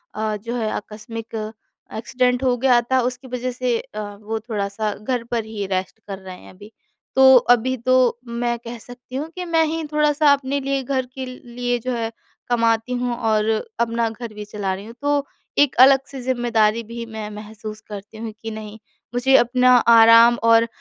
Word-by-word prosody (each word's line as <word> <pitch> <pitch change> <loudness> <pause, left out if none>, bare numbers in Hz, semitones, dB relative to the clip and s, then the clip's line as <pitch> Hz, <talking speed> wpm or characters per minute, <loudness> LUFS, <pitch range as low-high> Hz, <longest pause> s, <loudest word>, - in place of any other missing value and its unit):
अ, 215 0 -1
जो 230 +4 -5
है 225 -3 -1
आकस्मिक 220 +2 -7 0.6
एक्सीडेंट 250 +2 0
हो 250 -1 +3
गया 250 -1 +4
था 260 - +4
उसकी 250 +1 -4
वजह 250 0 -3
से 250 -1 -1
अ, 215 - -9 0.2
वो 220 +1 -3
थोड़ा-सा 210 -1 -3
घर 240 +3 -3
पर 230 -2 0
ही 215 -2 -5
रेस्ट 185 +3 -2
कर 195 -2 -5
रहे 185 -1 -10
हैं - - -15
अभी। 205 +3 -14 0.4
तो 265 0 +8 0.2
अभी 250 +2 0
तो 255 0 +2
मैं 235 0 -2
कह 235 +1 -8
सकती 245 +2 -12
हूँ 295 +4 -3
कि 365 -1 -4
मैं 330 -1 +2
ही 320 +1 -2
थोड़ा-सा 300 -1 +3
अपने 280 0 -1
लिए, 275 0 -1
घर 260 0 -1
के 265 -1 -4
लिए 245 -1 -4
जो 255 +2 -4
है 225 -1 -3 0.4
कमाती 230 0 +1
हूँ 245 -1 -1
और 220 -3 +1 0.3
अपना 230 0 +1
घर 225 0 -8
भी 210 0 -7
चला 205 -2 -3
रही 195 +2 -7
हूँ, 230 - -10
तो 285 0 +1 0.3
एक 290 -2 +4
अलग 270 +1 +8
से 270 -2 -8
ज़िम्मेदारी 235 -3 +1
भी 230 +1 -7
मैं 220 -2 -7
महसूस 215 0 -8
करती 210 +1 -9
हूँ 225 0 -5
कि 225 - -5
नहीं 215 0 -8 0.4
मुझे 255 +2 +3
अपना 250 +1 +4 0.2
आराम 230 +1 +8
और 230 0 +5
235 Hz, 185 wpm, -21 LUFS, 220-255 Hz, 0.6 s, तो